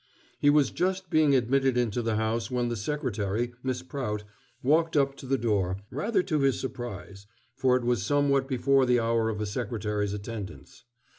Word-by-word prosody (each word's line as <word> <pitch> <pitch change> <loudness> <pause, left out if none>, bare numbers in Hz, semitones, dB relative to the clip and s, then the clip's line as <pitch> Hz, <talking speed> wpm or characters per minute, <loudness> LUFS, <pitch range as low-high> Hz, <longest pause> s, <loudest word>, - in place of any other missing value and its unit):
He 145 - +4
was 145 -2 +4
just 185 0 -1
being 155 -3 +4
admitted 130 +1 +2
into 120 -1 0
the 115 -1 -1
house 110 +1 -1
when 125 -2 0
the 120 - -2
secretary, 115 -2 -2
Miss 130 -1 -2
Prout, 120 -6 -4 0.4
walked 160 +4 +3
up 140 -1 +2
to 130 - -9
the 135 +1 +2
door 100 -6 0
rather 185 - 0
to 155 -5 0
his 135 -2 +2
surprise, 105 -6 -7 0.3
for 130 -1 +3
it 125 - -4
was 120 -4 +1
somewhat 140 +4 +2
before 135 0 +2
the 125 -1 +4
hour 115 -1 +1
of 105 -1 -3
a 105 - -1
secretary's 105 -2 -2
attendance. 105 +3 -8
125 Hz, 175 wpm, -28 LUFS, 110-140 Hz, 0.4 s, He